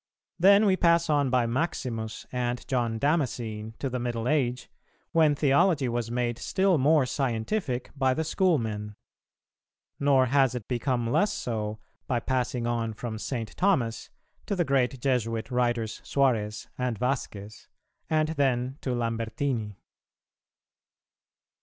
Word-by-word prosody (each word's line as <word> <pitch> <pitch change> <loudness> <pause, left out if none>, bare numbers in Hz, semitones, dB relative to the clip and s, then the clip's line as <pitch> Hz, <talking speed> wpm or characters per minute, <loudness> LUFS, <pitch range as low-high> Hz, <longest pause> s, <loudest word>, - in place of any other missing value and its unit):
Then 200 +4 +6
we 190 -2 +4
pass 170 -2 +3
on 145 -2 +2
by 125 -1 +2
Maximus 115 -4 -3
and 125 -1 -2
John 120 -3 0
Damascene 115 -7 -1
to 140 - -3
the 125 -1 -3
Middle 120 -1 -2
age, 125 -5 0 0.4
when 155 -3 +4
theology 140 +1 +3
was 120 -1 -2
made 120 -1 -1
still 190 -4 +2
more 145 +1 +4
scientific 125 - -2
by 130 -2 +2
the 160 - 0
Schoolmen; 115 - 0 1.0
nor 140 -2 +4
has 135 -1 +3
it 120 -4 -6
become 120 -2 -1
less 205 +9 +3
so, 110 -3 -3 0.3
by 120 - +1
passing 125 -1 -1
on 115 -2 -1
from 110 0 -5
St. 115 -2 -4
Thomas 135 - +1 0.4
to 200 - 0
the 175 -2 +1
great 135 -2 +1
Jesuit 120 -2 -1
writers 120 -3 0
Suarez 115 -7 0
and 125 -3 -1
Vasquez, 110 -4 -4 0.4
and 155 -1 +2
then 135 -3 0
to 130 -2 -2
Lambertini. 115 -1 -2
125 Hz, 130 wpm, -27 LUFS, 115-140 Hz, 1.0 s, Then